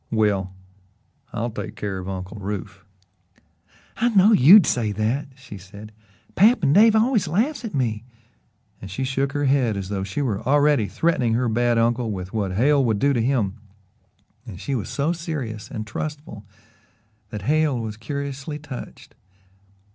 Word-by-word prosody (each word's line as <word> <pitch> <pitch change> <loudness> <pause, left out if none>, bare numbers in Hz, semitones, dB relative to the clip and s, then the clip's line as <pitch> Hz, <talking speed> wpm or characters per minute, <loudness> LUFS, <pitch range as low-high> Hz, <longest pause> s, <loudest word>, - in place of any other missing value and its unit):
"Well, 105 -4 +1 0.8
I'll 120 +2 -3
take 110 0 -6
care 100 -2 -4
of 95 +1 -6
Uncle 95 +2 -6
Rufe." 100 -1 -6 1.1
"I 240 +2 +2
knowed 210 0 +5
YOU'D 175 +9 +8
say 115 -4 0
that," 110 +8 -1
she 130 -7 -11
said. 100 +3 -12 0.4
"Pap 215 +2 +4
and 140 -1 +3
Dave 220 +4 +6
always 220 -3 +2
laughs 230 - 0
at 220 -9 -5
me," 115 -5 -1 0.8
and 95 - -8
she 115 +8 -4
shook 135 +1 -1
her 145 -1 -1
head 130 -6 +2
as 95 -1 -5
though 100 -2 -2
she 95 +9 -3
were 110 -6 -2
already 145 -2 +3
threatening 125 -8 0
her 125 +1 +1
bad 120 +1 +1
uncle 115 0 +1
with 95 -1 -6
what 100 -4 -2
Hale 140 +7 +3
would 110 -4 +1
do 140 +6 +2
to 120 - +1
him, 115 -5 0 0.9
and 95 -4 -9
she 140 - -4
was 120 -6 -3
so 150 +4 0
serious 145 -11 -5
and 110 -1 -5
trustful 120 -3 -7 0.8
that 105 -4 -7
Hale 150 0 +1
was 110 -2 -5
curiously 140 +5 -5
touched. 145 -4 -10
120 Hz, 160 wpm, -23 LUFS, 105-145 Hz, 1.1 s, YOU'D